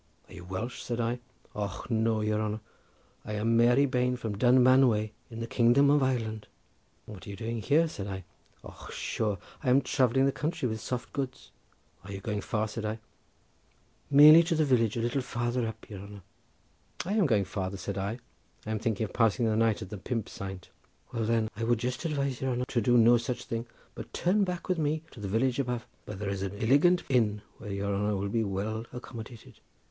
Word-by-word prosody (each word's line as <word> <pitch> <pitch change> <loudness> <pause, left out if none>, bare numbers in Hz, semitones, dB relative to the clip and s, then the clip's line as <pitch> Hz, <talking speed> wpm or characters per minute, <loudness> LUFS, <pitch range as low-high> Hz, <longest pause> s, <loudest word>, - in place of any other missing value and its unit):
"Are - - -13
you 90 - -10
Welsh?" 95 +7 -5
said 120 -1 -3
I. 120 +1 -1 0.3
"Och 105 +3 -5
no! 110 -1 +2
your 105 0 0
honour; 110 0 -2 0.6
I 105 - -6
am 110 +2 +1
Mary 120 +4 +5
Bane 125 -1 +1
from 110 -4 -4
Dunmanway 125 -2 +4 0.2
in 115 -1 -7
the - - -2
kingdom 120 +4 +4
of 145 0 +4
Ireland." 115 -5 -1 0.6
"And 110 - -9
what 95 - -12
are - - -7
you 100 - -5
doing 115 +2 -4
here?" 155 +7 +3
said 100 -10 -6
I. 95 -1 -5 0.4
"Och - - -11
sure! 105 -3 -2 0.2
I 130 - 0
am 130 +2 +5
travelling 130 +1 +2
the 140 - +3
country 150 -2 -2
with 110 -2 -4
soft 125 +1 -4
goods." 135 -2 -5 0.5
"Are 100 - -9
you 100 - -5
going 105 +1 -3
far?" 110 0 -1
said 110 +1 -6
I. 110 +1 -2 1.1
"Merely 150 +3 +9
to 170 0 0
the 155 -1 +3
village 115 -5 +2
a - - 0
little 120 +4 0
farther 120 -1 -1
up, 110 - -8
your 100 -3 -8
honour." 100 0 -10 0.8
"I 190 - -1
am 210 -6 +3
going 105 -6 +2
farther," 95 0 -4
said 100 0 -4
I; 100 +4 -2 0.5
"I 110 - -3
am 110 - -1
thinking 110 -1 -1
of 105 - -5
passing 115 0 +2
the 110 -1 +1
night 115 -1 +2
at 95 - -11
the 105 - -6
'Pump 115 +2 -3
Saint.'" 95 -2 -8 0.4
"Well, 115 -2 -1
then, 115 -1 +1
I 115 - -4
would 120 +1 +2
just 125 +6 -3
advise 140 -4 -1
your 135 - 0
honour 125 +1 -1
to 120 - +1
do 120 +3 +4
no 120 +1 +7
such 120 +1 -3
thing, 115 +1 -4 0.3
but - - -9
to - - -4
turn 195 +3 +3
back 180 -2 -4
with 180 -3 0
me 155 +1 0
to - - -12
the 100 - -4
village 120 +6 +1
above, 125 -3 -2 0.2
where 105 - -7
there 100 0 -3
is 100 -1 -3
an 100 0 -3
illigant 145 +10 +4
inn 105 -5 +1 0.2
where 105 -3 -7
your 100 0 -2
honour 105 +1 0
will 100 +1 -2
be 115 +2 +1
well 110 +3 -3
accommodated." 120 -2 -10
115 Hz, 215 wpm, -29 LUFS, 105-130 Hz, 1.1 s, Merely